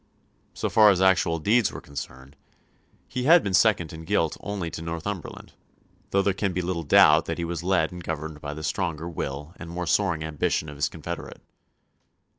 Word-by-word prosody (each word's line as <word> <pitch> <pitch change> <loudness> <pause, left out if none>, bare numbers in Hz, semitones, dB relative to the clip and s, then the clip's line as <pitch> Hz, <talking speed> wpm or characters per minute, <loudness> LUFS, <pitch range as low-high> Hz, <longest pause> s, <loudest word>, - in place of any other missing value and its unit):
So - - -2
far 110 -1 +6
as 95 -3 +3
actual 95 -3 +3
deeds 105 +7 +2
were - - -7
concerned, 65 0 -9 0.7
he 125 0 -3
had 170 +3 +7
been 100 - -2
second 90 -5 +3
in 80 0 -8
guilt 85 -3 0
only 100 -5 -4
to - - -6
Northumberland; 85 +2 -6 0.6
though 100 0 +2
there 100 - +2
can 95 -1 -2
be 90 - -1
little 85 -1 -2
doubt 75 +1 +5
that 85 - -3
he 85 - -2
was 85 -1 -4
led 90 -3 +1
and 90 -1 -8
governed 80 -1 -5
by 75 0 -5
the 80 - -7
stronger 80 +1 -2
will 75 -1 -5
and 85 - -9
more 90 +1 -4
soaring 85 -2 +1
ambition 80 0 -1
of 75 - -9
his 70 - 0
confederate. - - -7
85 Hz, 190 wpm, -25 LUFS, 80-95 Hz, 0.7 s, had